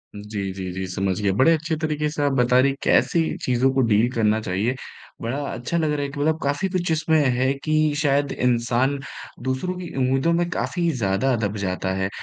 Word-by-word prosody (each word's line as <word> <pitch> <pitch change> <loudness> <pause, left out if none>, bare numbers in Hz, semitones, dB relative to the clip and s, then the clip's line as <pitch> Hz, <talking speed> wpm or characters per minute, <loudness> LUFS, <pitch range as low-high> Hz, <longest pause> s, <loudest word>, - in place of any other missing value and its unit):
जी, 105 -1 -4
जी, 95 -1 -5
जी, 95 0 -4
समझ 95 +1 -1
गया। 100 -2 +2
बड़े 130 - +5
अच्छे 160 +1 -1
तरीके 150 -1 -1
से 150 0 -4
आप 140 - +2
बता 125 -1 +3
रही, 135 +1 +3
कैसी 170 - +3 0.2
चीज़ों 130 +1 +2
को 135 - +2
डील 110 +2 +3
करना 110 -2 +2
चाहिए। 105 +7 -1 0.5
बड़ा 120 +5 -2
अच्छा 125 +8 -3
लग 155 -2 +1
रहा 150 - -1
है 140 - -2
कि 140 +1 -8
मतलब 155 +2 +1
काफ़ी 145 +7 0
कुछ 180 -2 -1
इसमें 160 0 +2 0.2
है 130 +2 +2
कि 155 -1 +2
शायद 145 -1 +1
इंसान 125 +3 +1 0.5
दूसरों 130 +8 -2
की 180 -2 -6
उम्मीदों 135 +5 +2
में 175 0 +1
काफ़ी 175 0 -1
ज़्यादा 120 +1 +1
दब 105 +1 -3
जाता 95 -1 -2
है। 95 0 -1
130 Hz, 200 wpm, -23 LUFS, 110-155 Hz, 0.5 s, बड़े